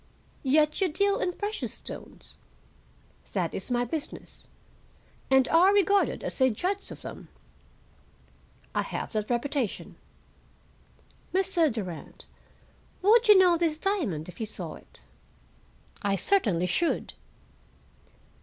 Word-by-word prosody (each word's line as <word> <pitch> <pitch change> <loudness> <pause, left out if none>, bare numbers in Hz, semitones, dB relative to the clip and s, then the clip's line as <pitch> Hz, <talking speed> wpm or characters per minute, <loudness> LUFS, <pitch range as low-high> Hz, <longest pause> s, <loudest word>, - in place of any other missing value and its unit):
"Yet 300 +5 +2
you 380 - +4
deal 400 +5 +1
in 360 - -1
precious 415 +3 -4
stones?" - - -9 1.0
"That - - -1
is - - -5
my 245 0 +1
business." 305 +5 -7 0.8
"And 265 -1 +5
are 355 +4 +6
regarded 400 0 +2
as - - -1
a 260 - +6
judge 375 - -2
of - - -10
them?" - - -9 1.5
"I - - +1
have - - -5
that 215 -2 -2
reputation." 245 -1 -2 1.4
"Mr. 355 -5 +2
Durand, 185 -8 -7 0.8
would 455 +4 +5
you 420 -2 +9
know 360 -2 +5
this 325 -2 0
diamond 310 - -1
if 180 - -11
you 220 - -3
saw 180 -6 -5
it?" - - -16 1.0
"I 200 -1 +1
certainly 195 - +2
should." 330 - -1
305 Hz, 115 wpm, -27 LUFS, -, 1.5 s, you